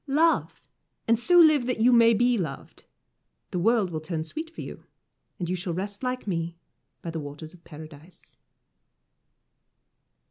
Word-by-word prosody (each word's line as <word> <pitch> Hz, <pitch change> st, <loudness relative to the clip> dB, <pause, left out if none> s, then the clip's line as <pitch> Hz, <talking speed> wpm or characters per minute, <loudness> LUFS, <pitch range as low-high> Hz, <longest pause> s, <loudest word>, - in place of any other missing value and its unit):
Love, 315 Hz, +4 st, +1 dB, 0.4 s
and 230 Hz, 0 st, +3 dB
so 355 Hz, +8 st, +4 dB
live 310 Hz, -7 st, +6 dB
that 250 Hz, -, -1 dB
you 245 Hz, +3 st, +5 dB
may 230 Hz, -1 st, +6 dB
be 245 Hz, +2 st, +3 dB
loved 170 Hz, -10 st, -6 dB, 0.7 s
the 180 Hz, -, -2 dB
world 215 Hz, -1 st, +2 dB
will 155 Hz, -1 st, -4 dB
turn 155 Hz, 0 st, -4 dB
sweet 315 Hz, -, -7 dB
for 330 Hz, -, -9 dB
you, -, -, -9 dB, 0.5 s
and 175 Hz, -, -4 dB
you 180 Hz, -, -1 dB
shall 175 Hz, -1 st, -3 dB
rest 200 Hz, +2 st, -4 dB
like 255 Hz, 0 st, -3 dB
me 170 Hz, -3 st, -3 dB, 0.5 s
by 170 Hz, -, -4 dB
the 165 Hz, -, -4 dB
Waters 150 Hz, +2 st, -9 dB
of 175 Hz, -1 st, -18 dB
Paradise. 155 Hz, +2 st, -14 dB
190 Hz, 155 wpm, -26 LUFS, 165-245 Hz, 0.7 s, live